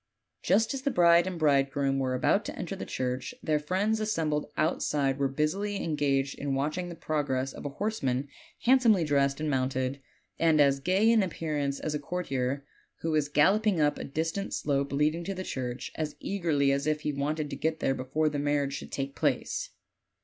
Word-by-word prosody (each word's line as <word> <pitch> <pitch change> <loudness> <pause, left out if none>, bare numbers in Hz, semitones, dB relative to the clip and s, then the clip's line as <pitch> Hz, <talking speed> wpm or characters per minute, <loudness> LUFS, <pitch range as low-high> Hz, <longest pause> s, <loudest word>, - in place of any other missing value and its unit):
Just 220 +6 +2
as 270 - -4
the 280 - 0
bride 170 -4 +5
and 185 -2 -4
bride 140 -3 +3
groom 135 -1 0
were 130 -1 0
about 125 - +2
to - - -5
enter - - -4
the - - -7
church, 130 - -3
their 155 -5 +1
friends 195 +8 0
as 215 0 -1
sembled 150 -5 -1
outside 145 -4 +1
were 140 - +2
busily 155 +9 -1
engaged 140 -3 0
in 140 -1 -1
watching 155 +6 -2
the 170 - -7
progress 135 -5 -1
of - - -9
a 140 - -9
horseman 145 - -1 0.3
handsomely 235 -7 +5
dressed 140 -2 +1
and 155 - -2
mounted, 130 0 -1 0.4
and 160 -2 +4
as 140 -1 +4
gay 190 +9 +2
in 230 -1 +5
appearance 150 -6 -2
as 155 - -3
a 150 - -1
courtier, 140 -4 -2 0.4
who 165 - -1
was 150 -2 +1
gallop 190 +10 +3
ing 190 -6 +3
up 150 -1 +2
a - - -4
distant 165 +7 -2
slope 140 -1 -1
leading 150 +4 +1
to 195 +2 -4
the 185 - -4
church, 125 -6 -4
as 150 -2 -3
eagerly 160 -8 +1
as 140 +2 0
if 155 0 0
he 150 - -2
wanted 150 +2 -2
to - - -3
get 160 0 -1
there 135 - +1
before 135 +4 -1
the 145 -1 -1
marriage 145 -1 0
should - - -7
take 135 0 -3
place. - - -1
150 Hz, 200 wpm, -29 LUFS, 140-170 Hz, 0.4 s, bride